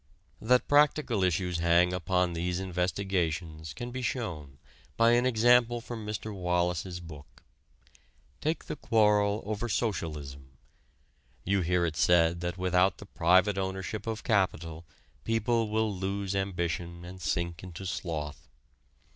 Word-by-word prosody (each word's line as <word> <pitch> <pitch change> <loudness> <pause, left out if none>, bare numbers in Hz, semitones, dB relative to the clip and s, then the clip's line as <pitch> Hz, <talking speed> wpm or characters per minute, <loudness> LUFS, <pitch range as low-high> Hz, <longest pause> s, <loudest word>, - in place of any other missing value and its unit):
That 125 +2 +3
practical 145 -7 +3
issues 90 -1 0
hang 85 +1 +4
upon 90 0 0
these 90 +2 -2
investigations 90 -4 -2
can 120 +9 -6
be 130 +1 -4
shown 85 - -4 0.4
by 115 0 +5
an 120 +1 +4
example 120 0 +4
from 115 -1 -7
Mr. 105 0 -4
Wallas's 90 -1 -1
book. 75 -5 -12 1.0
Take 160 +2 -2
the - - -4
quarrel 105 -3 +2
over 110 +3 -3
socialism. 75 - -3 0.9
You 100 +1 +1
hear 90 0 +1
it 80 -2 -2
said 85 0 +3
that 85 +1 -3
without 90 +1 +2
the 105 - -10
private 95 +2 +3
ownership 95 +2 -4
of 110 -1 -3
capital 85 -6 0 0.4
people 115 0 +1
will 110 -1 0
lose 95 +1 -2
ambition 85 -2 -3
and 90 +1 -10
sink 85 +1 -2
into 90 +1 -8
sloth. 80 -5 -4
95 Hz, 130 wpm, -29 LUFS, 85-110 Hz, 1.0 s, by